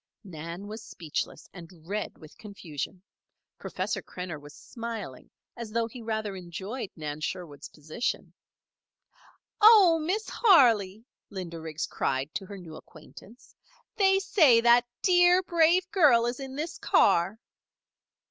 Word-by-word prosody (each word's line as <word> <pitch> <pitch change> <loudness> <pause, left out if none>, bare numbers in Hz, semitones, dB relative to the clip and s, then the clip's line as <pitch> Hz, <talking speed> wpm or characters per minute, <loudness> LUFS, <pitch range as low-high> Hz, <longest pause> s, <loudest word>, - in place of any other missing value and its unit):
Nan 170 0 -8
was 215 +2 -8
speechless, 160 -7 -6
and 170 -2 -12 0.2
red 210 +2 -4
with 155 - -15
confusion. 185 -3 -8 0.6
Professor - - -4
Krenner 175 -5 -8
was 145 0 -13
smiling, 225 - -8 0.3
as 235 -2 -7
though 230 +1 0
he 235 +2 -10
rather 220 -3 -3
enjoyed 190 +6 -6
Nan 150 -1 -6
Sherwood's 150 -3 -6
position. 155 +10 -5 1.3
"Oh, 410 -7 +7
Miss 375 +8 -2
Harley!" 230 - +3 0.2
Linda 175 -4 -7
Riggs 160 -1 -4
cried 135 +2 -2
to 195 - -5
her 200 - -9
new 165 -4 -11
acquaintance. 190 +10 -16 0.4
"They 385 -2 +4
say 320 - +4
that 240 +1 +4 0.2
dear, 355 0 +5
brave 345 +1 +3
girl 280 - +4
is 240 +2 -3
in 270 -1 -7
this 310 +4 -5
car." 175 +5 +2
215 Hz, 130 wpm, -27 LUFS, 170-275 Hz, 1.3 s, Oh